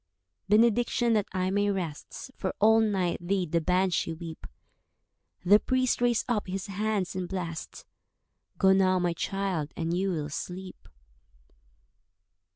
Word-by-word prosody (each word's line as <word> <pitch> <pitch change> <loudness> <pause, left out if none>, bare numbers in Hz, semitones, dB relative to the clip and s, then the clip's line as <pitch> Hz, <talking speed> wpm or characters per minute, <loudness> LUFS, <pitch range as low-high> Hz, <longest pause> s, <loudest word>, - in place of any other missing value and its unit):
"Benediction, 235 +2 +3
that 210 -2 +1
I 185 -1 -1
may 205 +1 +1
rest, 180 - -5
For 190 - -3
all 220 +2 +6
night 190 -5 0
did 185 -4 0
the 170 -1 +2
Banshee 180 -1 +1
weep." 165 -1 -9 1.0
The 205 +4 +7
priest 255 0 0
raised 240 -2 +2
up 225 -6 -1
his 190 +1 -4
hands 205 -2 -2
and 185 -1 -3
blest— 170 -4 -5 0.7
"Go 190 -1 +5
now, 185 -1 +3
my 175 -1 0
child, 185 -4 -2
and 165 0 -1
you 195 +2 0
will 155 -5 -2
sleep." 185 +5 -7
190 Hz, 135 wpm, -28 LUFS, 175-210 Hz, 1.0 s, The